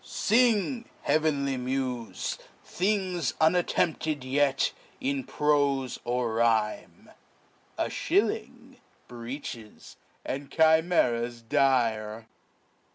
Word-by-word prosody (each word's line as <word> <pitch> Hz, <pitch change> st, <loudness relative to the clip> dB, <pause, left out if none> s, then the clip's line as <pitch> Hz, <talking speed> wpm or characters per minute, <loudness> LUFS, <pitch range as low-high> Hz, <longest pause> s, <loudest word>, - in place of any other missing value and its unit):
Sing, 235 Hz, 0 st, +1 dB
heavenly 145 Hz, -3 st, +1 dB
mufey 125 Hz, -2 st, -3 dB, 0.3 s
Things 185 Hz, -5 st, -1 dB
unattentptedyety 145 Hz, -5 st, +1 dB, 0.3 s
in 275 Hz, 0 st, -1 dB
profe 140 Hz, -, +1 dB
or 120 Hz, -2 st, -1 dB
rhime, 105 Hz, -7 st, 0 dB, 0.7 s
A -, -, 0 dB
Shilling, -, -, -1 dB, 0.3 s
Breeches, 120 Hz, -2 st, -8 dB, 0.3 s
and 140 Hz, +1 st, -4 dB
Chimeras 150 Hz, -8 st, +2 dB
dire. 115 Hz, -3 st, +1 dB
135 Hz, 70 wpm, -28 LUFS, 120-160 Hz, 0.7 s, Chimeras